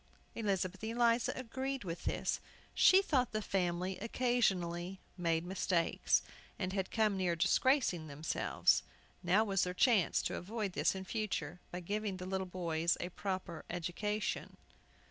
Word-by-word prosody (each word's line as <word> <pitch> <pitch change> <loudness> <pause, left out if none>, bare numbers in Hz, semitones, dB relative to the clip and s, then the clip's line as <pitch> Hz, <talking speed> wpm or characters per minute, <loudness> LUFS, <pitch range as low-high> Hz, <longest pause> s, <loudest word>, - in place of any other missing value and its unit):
Elizabeth 195 -3 -1
Eliza 230 +1 +2
agreed 260 +1 -3
with 170 -2 -5
this. - - 0 0.3
She 380 +1 +6
thought 255 - +1
the 215 - +1
family 185 -1 -1
occasionally 195 -7 0 0.2
made 165 -2 0
mistakes, 180 -2 +1 0.3
and 185 -1 -2
had 190 -2 -1
come 215 -3 +2
near 180 -3 +1
disgracing 185 - +2
themselves. 150 +2 +1 0.4
Now 185 +5 +4
was 195 -3 +1
their 180 0 -2
chance 220 -5 +3
to - - -2
avoid 205 +1 -3
this - - +2
in 190 0 -5
future 180 -7 -3
by 180 - -5
giving 205 +1 -2
the 180 - -6
little 190 0 -2
boys 170 -2 0
a 175 - -3
proper 185 -3 -4
education. 195 +5 -2
190 Hz, 140 wpm, -35 LUFS, 175-220 Hz, 0.4 s, She